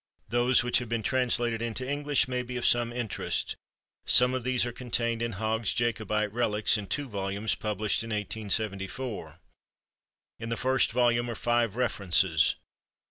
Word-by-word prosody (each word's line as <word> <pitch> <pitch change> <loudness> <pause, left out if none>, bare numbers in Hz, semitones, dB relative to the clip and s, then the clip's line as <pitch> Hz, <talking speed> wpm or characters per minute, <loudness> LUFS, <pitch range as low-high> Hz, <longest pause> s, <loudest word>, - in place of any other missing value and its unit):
Those 120 +1 +3
which 120 -1 +2
have 120 -2 -6
been 115 -1 -1
translated 120 -2 +1
into 115 +2 -3
English 145 -1 +1
may 125 -1 -1
be 125 0 -6
of 120 - -2
some 120 -1 +3
interest. 120 -3 -2 0.5
Some 125 +1 +5
of 130 -2 -2
these 125 0 +1
are 120 - -3
contained 115 -1 -1
in 115 -1 -2
Hogg's 110 +3 -1
Jacobite 110 -3 -1
Kelics, 110 -3 +2
in 105 -3 -3
two 145 +8 -2
volumes, 100 0 -2
published 105 +1 -1
in 115 - -7
1874. 105 +2 -3 1.0
In 115 0 -5
the 115 - -2
first 130 +1 +2
volume 120 -1 +2
are 115 - -4
five 120 -2 +1
references. 95 -8 +2
115 Hz, 155 wpm, -28 LUFS, 105-125 Hz, 1.0 s, Some